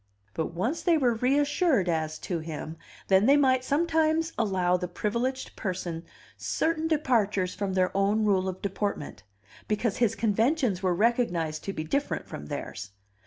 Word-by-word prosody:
But, 160 +1 -3
once 235 - -1
they 340 -3 +3
were 250 -5 +2
reassured 280 - +2
as 155 -2 -1
to 175 -3 -2
him, 155 0 -6 0.3
then 195 +3 +4
they 280 +2 +6
might 260 -2 +3
sometimes 320 +2 +1
allow 185 -5 +1
the 180 0 -2
privileged 235 +8 -2
person 175 -4 -4 0.3
certain 320 0 -1
departures 220 - +1
from 200 -2 -3
their 185 0 +1
own 205 +2 +2
rule 190 -2 +2
of 185 0 -8
deportment, 195 - -3 0.5
because 210 0 0
his 235 -4 +2
conventions 225 - +1
were 185 -2 +1
recognized 175 -8 +1
to 195 - -3
be 155 - -4
different 280 - -1
from 75 - -8
theirs. 100 +6 -6
205 Hz, 155 wpm, -27 LUFS, 180-260 Hz, 0.5 s, they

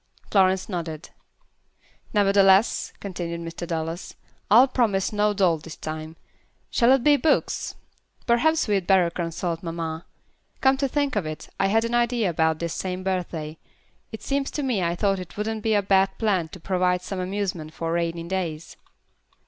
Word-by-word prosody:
Florence 190 -2 +3
nodded. 165 -4 -5 1.0
"Nevertheless," 200 0 +4
continued 175 -3 -5
Mr. 170 +1 -6
Dallas, 165 +1 -4 0.3
"I'll 235 +6 +7
promise 220 -7 +1
no 210 0 +2
doll 185 -5 +2
this 160 +1 -10
time. 155 +1 -6 0.6
Shall 240 +1 +4
it 270 -3 +2
be 290 0 +5
books? 300 +4 0 0.5
Perhaps 310 +7 +2
we'd 195 -4 0
better 185 -3 +4
consult 165 0 -3
mamma. 165 -1 -5 0.5
Come 265 0 +4
to 275 0 0
think 285 0 -1
of 195 -7 -1
it, 155 0 -7
I 195 - +3
had 225 +3 +2
an 230 - -3
idea 240 -4 +2
about 160 -1 +1
this 170 0 -3
same 185 0 -4
birthday. 170 -5 -3 0.5
It 220 - -8
seems 275 0 -1
to 295 - -3
me 245 -8 0
I 170 0 0
thought 195 +1 +1
it 180 +1 -9
wouldn't 215 +1 -2
be 220 0 +1
a 205 - +2
bad 195 0 +2
plan 195 -7 +1
to 185 - -11
provide 180 0 0
some 190 0 -5
amusement 185 -4 -3
for 165 +1 -4
rainy 170 0 -1
days." 170 -3 -4
190 Hz, 165 wpm, -24 LUFS, 170-215 Hz, 1.0 s, I'll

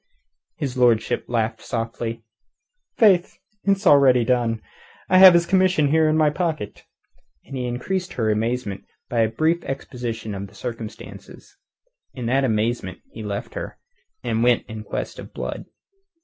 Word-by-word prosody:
His 135 -4 -4
lordship 120 -3 +2
laughed 115 -1 -1
softly. 115 0 -4 0.7
"Faith, 190 -6 +4 0.3
it's 195 0 +2
done 170 - +7
already. 130 -4 +5
I 120 +9 -1
have 185 -2 +10
his 170 0 +4
commission 180 -6 +3
in 155 -1 +3
my 155 -1 +4
pocket." 155 - -3 0.6
And 135 - -8
he 125 -1 -2
increased 180 +10 -3
her 110 -3 0
amazement 110 -2 -2 0.3
by 120 - -1
a 110 -1 +3
brief 160 +7 0
exposition 120 -5 -5
of 100 0 -5
the 100 - -20
circumstances. 115 -1 -9 0.6
In 125 -3 -5
that 135 +4 +2
amazement 110 -4 -1
he 110 - -9
left 100 -1 -5
her, - - -6 0.5
and 110 - -1
went 120 0 +3
in 110 -1 -8
quest - - -5
of - - -11
Blood. - - -5
125 Hz, 145 wpm, -22 LUFS, 115-155 Hz, 0.7 s, have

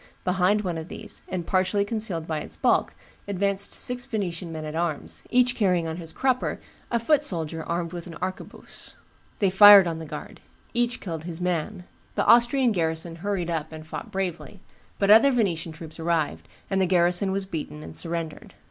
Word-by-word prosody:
Behind 185 +3 +2
one 175 -4 -2
of 160 - -7
these, - - -9
and 180 -3 -3
partially 190 +3 +1
concealed 205 -7 -2
by 160 -2 -2
its - - -6
bulk, - - +1 0.3
advanced 200 0 -1
six 245 0 0
Venetian 180 -7 -4
men 155 -1 -5
at 155 - -5
arms, 165 -3 -1
each 250 0 +3
carrying 180 -6 +2
on 160 0 -4
his 165 -2 -8
crupper 260 -1 0 0.3
a 235 - +1
foot 290 +6 +2
soldier 165 - -2
armed 170 +1 -3
with 175 0 -6
an 165 - -9
arquebuse; 185 +2 -6 0.4
they 195 -3 +2
fired 200 -1 +9
on 165 -1 -3
the 160 - -7
guard; - - -8 0.3
each 240 +1 0
killed 165 -4 -5
his 170 -1 -5
man; 180 +2 -2 0.3
the - - +1
Austrian 240 +1 +5
garrison 165 -2 -1
hurried 180 -1 -2
up 160 -1 -3
and 155 0 -9
fought 160 - -7
bravely; 190 +1 -4 0.4
but 200 0 +3
other 225 +6 +8
Venetian 195 -10 0
troops 160 0 -10
arrived, 160 - -1 0.2
and 195 -1 0
the 185 - +3
garrison 180 +2 +2
was 195 0 -1
beaten 150 - -6
and 80 0 -9
surrendered. 165 - -4
180 Hz, 185 wpm, -25 LUFS, 165-205 Hz, 0.4 s, fired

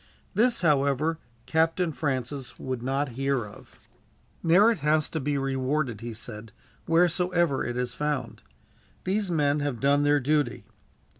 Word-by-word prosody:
This, 235 0 +3
however, 150 0 +2 0.3
Captain 165 +2 +1
Francis 135 -2 -3
would 130 -2 -4
not 135 +3 -1
hear 135 -1 -1
of. 105 - -15 0.6
"Merit 195 +6 +4
has 150 +1 +2
to 160 - -3
be 145 0 -1
rewarded," 135 -3 -1
he 120 0 -5
said, 110 -1 -8 0.4
"wheresoever 175 -2 +2
it 120 0 -3
is 125 0 -2
found. 145 -4 -3 0.6
These 195 +1 -1
men 150 -3 +2
have 145 -5 -2
done 140 +1 +3
their 145 0 +3
duty. 135 -5 0
145 Hz, 135 wpm, -27 LUFS, 130-160 Hz, 0.6 s, Merit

